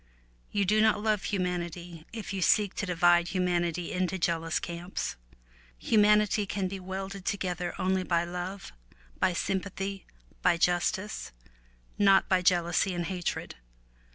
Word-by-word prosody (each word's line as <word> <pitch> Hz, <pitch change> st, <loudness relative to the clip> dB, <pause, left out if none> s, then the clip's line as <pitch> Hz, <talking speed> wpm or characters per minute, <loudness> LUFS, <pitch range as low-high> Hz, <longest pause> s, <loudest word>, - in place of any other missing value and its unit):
You 200 Hz, -1 st, 0 dB
do 215 Hz, +3 st, +3 dB
not 220 Hz, -1 st, +4 dB
love 215 Hz, -3 st, +1 dB
humanity 175 Hz, -3 st, -3 dB
if 220 Hz, -3 st, -6 dB
you 190 Hz, -, -2 dB
seek 205 Hz, +2 st, +3 dB
to 205 Hz, -, -2 dB
divide 175 Hz, 0 st, +4 dB
humanity 175 Hz, -2 st, -1 dB
into 185 Hz, +1 st, -1 dB
jealous 165 Hz, -2 st, 0 dB
camps. 175 Hz, +2 st, -4 dB, 0.6 s
Humanity 210 Hz, -, +3 dB
can 195 Hz, -1 st, -1 dB
be 195 Hz, +1 st, -5 dB
welded 190 Hz, +1 st, -6 dB
together 180 Hz, -3 st, -2 dB
only 190 Hz, 0 st, +1 dB
by 170 Hz, -2 st, +1 dB
love, 180 Hz, +3 st, -6 dB, 0.5 s
by 185 Hz, -, +2 dB
sympathy, 195 Hz, +2 st, -3 dB, 0.3 s
by 170 Hz, -, +3 dB
justice, 180 Hz, -, 0 dB, 0.7 s
not 195 Hz, -1 st, +5 dB
by 185 Hz, -1 st, +3 dB
jealousy 175 Hz, +1 st, +2 dB
and 175 Hz, -1 st, -2 dB
hatred. 180 Hz, 0 st, -4 dB
185 Hz, 130 wpm, -29 LUFS, 175-195 Hz, 0.7 s, not